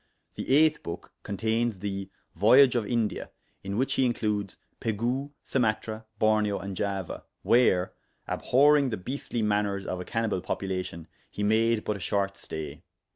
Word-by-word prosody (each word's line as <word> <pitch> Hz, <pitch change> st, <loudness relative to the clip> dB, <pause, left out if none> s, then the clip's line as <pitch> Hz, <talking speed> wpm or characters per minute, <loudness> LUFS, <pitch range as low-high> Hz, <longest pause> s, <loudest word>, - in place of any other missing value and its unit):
The -, -, -5 dB
8th 155 Hz, +3 st, +4 dB
book 85 Hz, -, -7 dB
contains 110 Hz, +2 st, -1 dB
the 100 Hz, 0 st, -4 dB, 0.2 s
voyage 125 Hz, +8 st, +6 dB
of 115 Hz, -4 st, 0 dB
India, 115 Hz, -2 st, -1 dB, 0.3 s
in 100 Hz, +1 st, -3 dB
which 135 Hz, +2 st, +1 dB
he 130 Hz, -, +2 dB
includes 105 Hz, -4 st, -1 dB, 0.2 s
Pegu, 120 Hz, +6 st, -1 dB
Sumatra, 110 Hz, -2 st, -1 dB
Borneo, 110 Hz, -1 st, +2 dB
and 100 Hz, -1 st, -5 dB
Java, 100 Hz, -2 st, -3 dB, 0.2 s
where, 105 Hz, -7 st, +3 dB, 0.3 s
abhorryng 145 Hz, +1 st, +4 dB
the 110 Hz, -, -2 dB
beastly 120 Hz, +3 st, -3 dB
maners 105 Hz, -2 st, 0 dB
of 90 Hz, -, -3 dB
a -, -, -7 dB
cannibal 115 Hz, -4 st, -1 dB
population, 90 Hz, -4 st, -4 dB, 0.2 s
he 105 Hz, -, -4 dB
made 110 Hz, +1 st, +3 dB
but 105 Hz, -, -2 dB
a -, -, -10 dB
short 100 Hz, +2 st, -1 dB
stay. 75 Hz, -5 st, -7 dB
105 Hz, 145 wpm, -28 LUFS, 100-120 Hz, 0.3 s, voyage